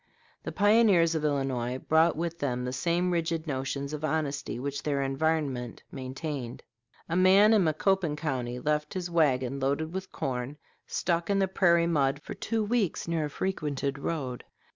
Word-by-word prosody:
The -, -, -5 dB
pioneers 205 Hz, -5 st, +4 dB
of 160 Hz, -2 st, -1 dB
Illinois 135 Hz, -4 st, -1 dB
brought 160 Hz, +4 st, +3 dB
with 170 Hz, 0 st, -3 dB
them 125 Hz, -3 st, -1 dB
the 125 Hz, -, -3 dB
same 170 Hz, +6 st, 0 dB
rigid 165 Hz, -1 st, -1 dB
notions 140 Hz, 0 st, -3 dB
of 150 Hz, 0 st, -5 dB
honesty 150 Hz, -5 st, -2 dB
which 140 Hz, +2 st, -4 dB
their 140 Hz, -2 st, 0 dB
environment 135 Hz, -4 st, -1 dB
maintained. 130 Hz, -1 st, -5 dB, 0.4 s
A 165 Hz, -, -2 dB
man 195 Hz, +4 st, +6 dB
in 210 Hz, -3 st, +5 dB
Macoupin 165 Hz, +1 st, +1 dB
County 130 Hz, -6 st, -3 dB
left 150 Hz, +4 st, -1 dB
his 180 Hz, -2 st, -3 dB
wagon, 135 Hz, -5 st, +2 dB
loaded 140 Hz, +5 st, -1 dB
with 190 Hz, 0 st, -5 dB
corn, 130 Hz, +2 st, -3 dB, 0.3 s
stuck 170 Hz, 0 st, -1 dB
in 200 Hz, -, +2 dB
the 195 Hz, -1 st, +2 dB
prairie 170 Hz, -3 st, +3 dB
mud 145 Hz, -4 st, +1 dB
for -, -, -6 dB
two 225 Hz, -1 st, -2 dB
weeks 210 Hz, -6 st, 0 dB
near 165 Hz, -2 st, 0 dB
a -, -, -4 dB
frequented 145 Hz, -5 st, -2 dB
road. 140 Hz, -5 st, -3 dB
155 Hz, 165 wpm, -28 LUFS, 135-170 Hz, 0.4 s, man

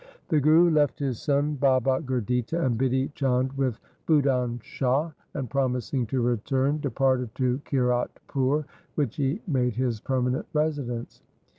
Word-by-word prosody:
The 155 Hz, -, +3 dB
Guru 160 Hz, +4 st, +5 dB
left 150 Hz, -2 st, +2 dB
his 135 Hz, -5 st, -3 dB
son 145 Hz, +1 st, +1 dB
Baba 130 Hz, -1 st, +3 dB
Gurditta 125 Hz, +2 st, -1 dB
and 125 Hz, -3 st, +1 dB
Bidhi 130 Hz, +3 st, 0 dB
Chand 130 Hz, -1 st, 0 dB
with 130 Hz, -5 st, -1 dB, 0.3 s
Budhan 130 Hz, -6 st, +2 dB
Shah, 135 Hz, +5 st, 0 dB, 0.2 s
and, 135 Hz, -4 st, -3 dB
promising 125 Hz, -1 st, -1 dB
to 130 Hz, +3 st, -1 dB
return, 130 Hz, +5 st, +1 dB
departed 130 Hz, -2 st, +1 dB
to 130 Hz, 0 st, 0 dB
Kiratpur, 130 Hz, +2 st, 0 dB, 0.3 s
which 140 Hz, -7 st, -1 dB
he 145 Hz, +8 st, -1 dB
made 125 Hz, -, +1 dB
his 120 Hz, -3 st, -1 dB
permanent 130 Hz, +3 st, -1 dB
residence. 145 Hz, -6 st, -2 dB
130 Hz, 135 wpm, -26 LUFS, 125-145 Hz, 0.3 s, Guru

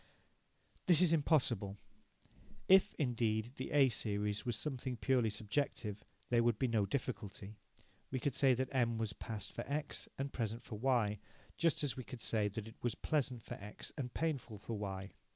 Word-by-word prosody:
This 175 Hz, -4 st, +7 dB
is 175 Hz, -2 st, +5 dB
impossible. 120 Hz, -10 st, +2 dB, 0.9 s
If, 190 Hz, 0 st, +6 dB
indeed, 115 Hz, -4 st, +1 dB
the 130 Hz, -, -4 dB
A 140 Hz, -3 st, +5 dB
series 105 Hz, 0 st, -1 dB
was 120 Hz, -, +1 dB
something 130 Hz, 0 st, -3 dB
purely 125 Hz, -1 st, +2 dB
subjective, 105 Hz, -1 st, -2 dB, 0.3 s
there 120 Hz, -1 st, +5 dB
would 115 Hz, -2 st, +3 dB
be 130 Hz, -, +2 dB
no 110 Hz, -4 st, +2 dB
difficulty. 105 Hz, -6 st, -4 dB, 0.5 s
We 130 Hz, -, -1 dB
could 140 Hz, +2 st, 0 dB
say 135 Hz, -1 st, +5 dB
that 130 Hz, +1 st, -1 dB
M 120 Hz, -3 st, +2 dB
was 110 Hz, -2 st, -1 dB
past 110 Hz, -1 st, -5 dB
for -, -, -3 dB
X 150 Hz, +1 st, -2 dB
and 135 Hz, +1 st, -3 dB
present 115 Hz, -1 st, -2 dB
for 110 Hz, -4 st, -7 dB
Y, 115 Hz, -5 st, +2 dB, 0.4 s
just 165 Hz, -3 st, +2 dB
as 145 Hz, -, +1 dB
we 130 Hz, -, -5 dB
could 120 Hz, -1 st, -6 dB
say 110 Hz, -2 st, +2 dB
that 105 Hz, +1 st, -5 dB
it 110 Hz, -, -13 dB
was 120 Hz, -2 st, 0 dB
pleasant 130 Hz, -7 st, 0 dB
for -, -, -6 dB
X 105 Hz, +1 st, -7 dB
and 130 Hz, -5 st, -3 dB
painful 140 Hz, -9 st, -2 dB
for 110 Hz, +3 st, -6 dB
Y. 95 Hz, -2 st, -4 dB
120 Hz, 175 wpm, -36 LUFS, 105-135 Hz, 0.9 s, This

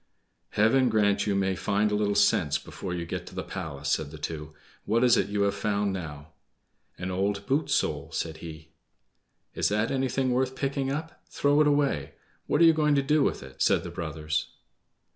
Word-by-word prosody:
"Heaven 120 Hz, +5 st, +3 dB
grant 105 Hz, -2 st, +2 dB
you 100 Hz, -, +1 dB
may 95 Hz, -1 st, +1 dB
find 100 Hz, +2 st, 0 dB
a -, -, +1 dB
little 105 Hz, -1 st, +1 dB
sense 75 Hz, -1 st, +3 dB
before 90 Hz, +5 st, -7 dB
you 85 Hz, -1 st, -3 dB
get -, -, -5 dB
to -, -, -11 dB
the -, -, -3 dB
palace!" 70 Hz, 0 st, -5 dB
said 75 Hz, -2 st, 0 dB
the 80 Hz, -, -10 dB
two. 75 Hz, 0 st, -5 dB, 0.3 s
"What 115 Hz, +3 st, +1 dB
is 125 Hz, -2 st, +6 dB
it -, -, +1 dB
you 100 Hz, 0 st, 0 dB
have 100 Hz, 0 st, +2 dB
found 100 Hz, -1 st, -1 dB
now?" 80 Hz, -4 st, -7 dB, 0.7 s
"An 90 Hz, +1 st, -4 dB
old 100 Hz, +2 st, -1 dB
boot 140 Hz, +4 st, 0 dB
sole," -, -, 0 dB
said 80 Hz, -1 st, -3 dB
he. 80 Hz, -1 st, -10 dB, 0.8 s
"Is -, -, +1 dB
that 105 Hz, +2 st, 0 dB
anything 130 Hz, -1 st, 0 dB
worth 130 Hz, +1 st, 0 dB
picking 135 Hz, -1 st, -1 dB
up? 160 Hz, +3 st, -5 dB
Throw 145 Hz, +1 st, +2 dB
it 150 Hz, -, +4 dB
away! 140 Hz, -, +1 dB, 0.3 s
What -, -, +2 dB
are -, -, +8 dB
you 165 Hz, -, +7 dB
going 150 Hz, -2 st, +2 dB
to 140 Hz, -, +2 dB
do 150 Hz, +2 st, +3 dB
with 135 Hz, -, 0 dB
it?" 65 Hz, 0 st, -12 dB
said -, -, +3 dB
the 85 Hz, -, -6 dB
brothers. 80 Hz, -2 st, -3 dB
100 Hz, 200 wpm, -27 LUFS, 80-130 Hz, 0.8 s, are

